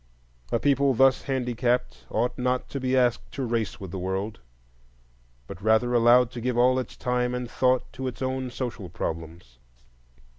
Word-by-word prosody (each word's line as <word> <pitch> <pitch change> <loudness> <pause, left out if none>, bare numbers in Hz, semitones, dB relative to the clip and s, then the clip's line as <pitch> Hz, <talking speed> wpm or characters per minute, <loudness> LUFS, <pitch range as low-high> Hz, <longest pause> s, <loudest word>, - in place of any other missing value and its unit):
A - - +3
people 140 +1 +2
thus 135 +2 +4
handicapped 125 -2 -1
ought 120 +2 0
not 125 0 -1
to 140 - -4
be 130 0 +1
asked 120 -2 +1
to 135 - -3
race 115 -2 -2
with 95 -4 -7
the 95 - -4
world, 95 +4 -3 1.1
but - - -10
rather 110 +3 +3
allowed 120 +1 +5
to 120 - -6
give 125 0 -1
all 130 +1 +4
its 130 - -6
time 125 0 0
and 125 0 -3
thought 130 +1 +1
to 130 +1 -4
its 130 +1 -5
own 130 0 -2
social 120 -7 -5
problems. 80 -6 -6
125 Hz, 170 wpm, -26 LUFS, 110-130 Hz, 1.1 s, allowed